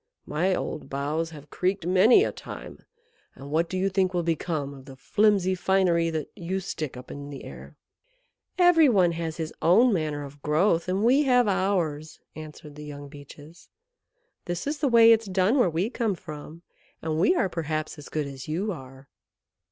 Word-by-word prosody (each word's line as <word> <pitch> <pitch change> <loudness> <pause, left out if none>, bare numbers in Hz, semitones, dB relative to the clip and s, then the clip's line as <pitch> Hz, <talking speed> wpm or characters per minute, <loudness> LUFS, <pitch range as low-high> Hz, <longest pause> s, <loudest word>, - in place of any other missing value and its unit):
My 180 +5 0
old 155 - -5
boughs 150 +4 -2
have 150 -2 -13
creaked 185 -1 -1
many 190 - +5
a - - -1
time; - - -10 0.6
and 140 +1 -10
what 165 +2 +1
do 185 - -3
you 190 +1 +1
think 190 -1 0
will 175 - 0
become 160 -3 -2
of 135 -1 -13
the 135 -2 -11
flimsy 195 +6 +2
finery 180 -2 +2
that 155 -3 -4
you 185 0 -3
stick 155 -8 -5
up 125 - -10
in 145 0 -8
the 140 -2 -8
air?" - - -11 0.8
"Every 350 -5 +6
one 185 -7 +3
has 165 -1 -4
his 160 -2 -4
own 220 +8 +5
manner 155 -4 -2
of 140 +1 -13
growth, 165 +4 +1
and 190 +3 0
we 255 +5 +5
have 250 -3 +4
ours," 175 -6 -1 0.2
answered 155 -1 -10
the 150 +1 -10
young 145 -1 -9
Beeches. 145 +3 -14 0.8
"This 175 -1 -4
is 290 +1 -3
the 295 - +1
way 230 -1 +7
it's 225 -1 +3
done 190 +7 +2
where 215 - +4
we 175 +8 -1
come 225 -7 -1
from, 160 -1 -10 0.4
and 160 -1 -1
we 200 - +4
are 200 - +2
perhaps 155 -2 -4
as 145 - -11
good 155 -2 -2
as 135 -2 -8
you 185 +7 -2
are." 135 -4 -10
170 Hz, 185 wpm, -26 LUFS, 150-195 Hz, 0.8 s, way